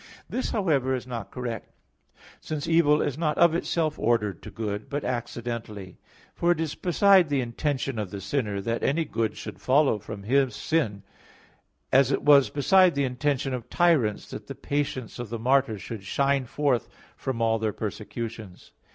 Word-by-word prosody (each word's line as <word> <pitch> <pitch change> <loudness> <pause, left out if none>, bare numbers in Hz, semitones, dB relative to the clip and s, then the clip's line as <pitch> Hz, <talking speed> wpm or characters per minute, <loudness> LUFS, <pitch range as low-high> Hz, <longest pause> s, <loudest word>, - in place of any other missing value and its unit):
This, 255 - -2
however, 145 - +1
is 125 - -5
not 120 -4 -6
correct; 120 -3 -6 0.6
since 155 -2 -4
evil 160 -3 +4
is 145 0 -3
not 150 -3 0
of 170 -1 +5
itself 165 -2 -1
ordered 105 -5 +1
to - - -9
good, 105 0 -4
but 145 0 -3
accidentally. 115 -5 -5 0.3
For 175 - +2
it 175 - +1
is 160 -2 -1
beside 185 -1 +4
the 140 -1 +1
intention 130 0 -2
of 105 -3 -3
the 100 - -6
sinner, 100 -1 -2
that 115 +3 -2
any 160 +4 +1
good 115 -6 -2
should - - -8
follow 135 -4 +3
from 105 0 -8
his 130 +1 +2
sin; 110 -12 -1 0.9
as 135 0 +5
it - - 0
was 145 -2 +6
beside 175 +5 +4
the 140 - +1
intention 135 +1 -1
of 125 -3 -5
tyrants 160 -12 +2
that - - -8
the - - -6
patience 135 -5 -3
of 120 -3 -5
the 115 - -3
martyrs 125 -4 +1
should 110 -4 -7
shine 140 +4 +1
forth 135 -1 0 0.3
from 130 -3 -4
all 115 -1 +2
their 110 -1 0
persecutions. 105 -1 -6
130 Hz, 170 wpm, -26 LUFS, 110-145 Hz, 0.9 s, was